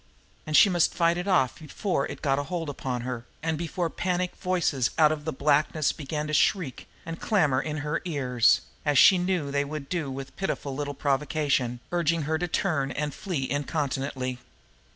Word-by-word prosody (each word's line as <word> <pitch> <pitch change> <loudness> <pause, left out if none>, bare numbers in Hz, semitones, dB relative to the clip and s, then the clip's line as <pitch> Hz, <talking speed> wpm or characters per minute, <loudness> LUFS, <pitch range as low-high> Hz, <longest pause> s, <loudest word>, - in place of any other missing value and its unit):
And 155 - +3
she - - +8
must 175 -4 +2
fight 170 -1 +3
it 180 - -4
off 135 -10 +2
before 155 0 -2
it - - -9
got 135 -1 +2
a 145 - -3
hold 165 -1 -3
upon 130 -3 -3
her, 125 -1 -5 0.2
and 160 -1 0
before 170 +2 -2
panic 180 +2 -2
voices 175 -9 +1
out 155 -1 +6
of 150 -1 -4
the 160 - -1
blackness 150 +2 +2
began 150 0 -4
to 150 - -4
shriek 155 - +1 0.2
and 165 0 -6
clamor 150 -12 +2
in 150 -1 -4
her 150 - -1
ears, 130 -8 +2 0.2
as 145 -2 +2
she 185 +7 +8
knew 175 -5 -1
they 140 0 +1
would 145 -1 -6
do 165 -6 -2
with 135 0 -7
pitifully 145 -7 -3
little 145 0 -3
provocation, 140 -3 0
urging 170 -2 +1
her 160 +2 -1
to 180 - -1
turn 155 -6 0
and 150 +1 -3
flee 155 -9 -3
incontinently. 140 -3 -2
150 Hz, 185 wpm, -27 LUFS, 135-170 Hz, 0.2 s, she